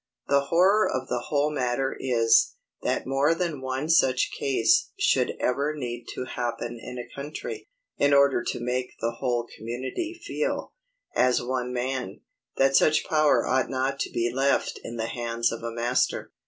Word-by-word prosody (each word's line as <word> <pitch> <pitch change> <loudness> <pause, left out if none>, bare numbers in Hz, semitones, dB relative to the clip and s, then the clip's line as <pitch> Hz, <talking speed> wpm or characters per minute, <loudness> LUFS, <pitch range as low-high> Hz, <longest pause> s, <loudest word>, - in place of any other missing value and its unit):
The 140 0 +3
horror 190 +7 +4
of 130 0 -3
the 120 -1 -2
whole 145 0 +1
matter 130 -1 -1
is, 115 -3 +3 0.3
that - - -1
more 135 +5 +2
than 165 -5 -2
one 130 +3 -3
such 130 -6 +3
case 135 -4 +2
should - - +2
ever 140 +4 0
need 120 -3 -5
to 130 - -4
happen 120 -1 -4
in 125 - -7
a 120 - -6
country, 150 - -6 0.3
in 145 - +4
order 140 -3 +4
to - - -2
make 125 +1 -2
the 115 0 -2
whole 120 -3 0
community 130 - -5
feel, - - -2 0.4
as 125 -1 +3
one 125 0 -2
man, 125 -4 -3 0.4
that 135 0 +4
such 155 +2 +4
power 155 -1 +3
ought 130 0 +1
not 135 +1 -1
to - - -1
be 120 0 -1
left 135 +2 +1
in 115 - -6
the 115 -1 -2
hands 115 0 -1
of 115 - -5
a 115 - -3
master. 120 +2 0
130 Hz, 165 wpm, -26 LUFS, 120-140 Hz, 0.4 s, horror